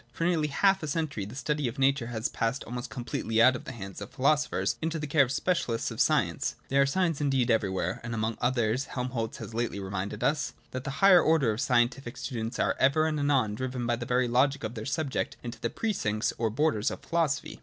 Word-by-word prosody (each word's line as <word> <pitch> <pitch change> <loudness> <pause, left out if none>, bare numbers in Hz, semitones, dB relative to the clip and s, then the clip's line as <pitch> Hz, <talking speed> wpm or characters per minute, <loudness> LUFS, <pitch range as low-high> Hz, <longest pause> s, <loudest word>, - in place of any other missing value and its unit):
For 165 - -2
nearly 165 -4 +2
half 195 +7 +3
a 155 - -4
century 145 -8 -2
the 105 +5 -9
study 150 0 -1
of 120 - -5
nature 135 -2 +2
has 115 -1 -2
passed 115 +3 -2
almost 120 +1 -6
completely 120 -3 -2
out 130 +3 +6
of - - -7
the - - -6
hands 100 -5 -8
of 100 - -6
the - - -23
philo 140 +4 +5
sophers 150 +1 -1
into 160 +1 -1
the 150 - -3
care 150 0 +3
of 135 - +4
the 130 - -2
specialists 130 -11 0
of - - -1
science. - - +1
There 140 +1 +4
are 140 - +4
signs 165 0 0
indeed 135 -4 +2
everywhere 95 -5 0
— - - -22
and 120 0 -4
among 110 0 -2
others 125 0 +1
Helmholtz 125 -3 -3
has - - -8
lately 115 -3 -2
reminded 95 0 -4
us 150 -1 0
— - - -33
that 130 0 -5
the - - -2 0.2
higher 185 -3 +8
order 155 -7 +3
of 110 +3 -3
scientific 125 0 +1
students 120 -1 -4
are - - +1
ever 140 +4 +4
and 155 -1 0
anon 135 -7 +2
driven 125 +2 -3
by 120 0 +1
the 120 0 -6
very 125 0 +2
logic 135 +3 +2
of 110 +1 -3
their 110 -1 -6
subject 135 0 -2
into 120 -1 -6
the 115 - 0
precincts 110 - -1
or 115 -1 +1
the 110 - -9
borders 145 -7 +2
of - - -7
philosophy. 160 -4 -1
130 Hz, 240 wpm, -28 LUFS, 115-145 Hz, 0.2 s, higher